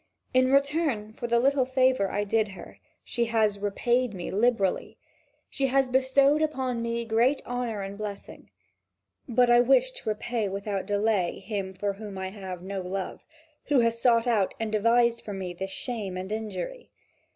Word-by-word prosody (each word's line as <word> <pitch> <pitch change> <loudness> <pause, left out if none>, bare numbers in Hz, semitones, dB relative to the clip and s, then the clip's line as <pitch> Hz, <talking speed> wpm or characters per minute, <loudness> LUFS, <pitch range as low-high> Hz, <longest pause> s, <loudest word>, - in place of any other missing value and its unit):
In 255 0 +4
return 275 -6 +1
for 240 - -5
the 235 0 +3
little 270 0 +2
favour 255 -6 +2
I 205 - -1
did 215 +1 +1
her, - - -12 0.2
she 235 -1 -1
has 220 -3 +1
repaid 235 +3 0
me 175 - -5
liberally: 210 -3 +1 0.5
she 275 -1 -1
has 270 0 +2
bestowed 270 +3 +3
upon 260 -6 -1
me 235 0 -2
great 235 +5 +2
honour 240 -4 -3
and 195 +1 -7
blessing. 205 -2 -7 0.8
But 245 +1 +4
I 240 0 +7
wish 485 - +4
to - - -4
repay 215 0 -2
without 195 0 -3
delay 205 -3 +1
him 195 -1 -5
for 200 +1 -1
whom 205 -1 -8
I 190 0 -3
have 190 -3 -7
no 195 0 -4
love, 185 +1 -5 0.4
who 285 -4 +3
has 230 0 0
sought 230 -2 +4
out 220 -6 +1
and 225 -1 -2
devised 235 +2 +3
for 205 - -7
me 185 -2 -5
this 190 +2 -5
shame 205 -3 -4
and 185 +2 -5
injury. 220 - -5
225 Hz, 170 wpm, -27 LUFS, 200-250 Hz, 0.8 s, I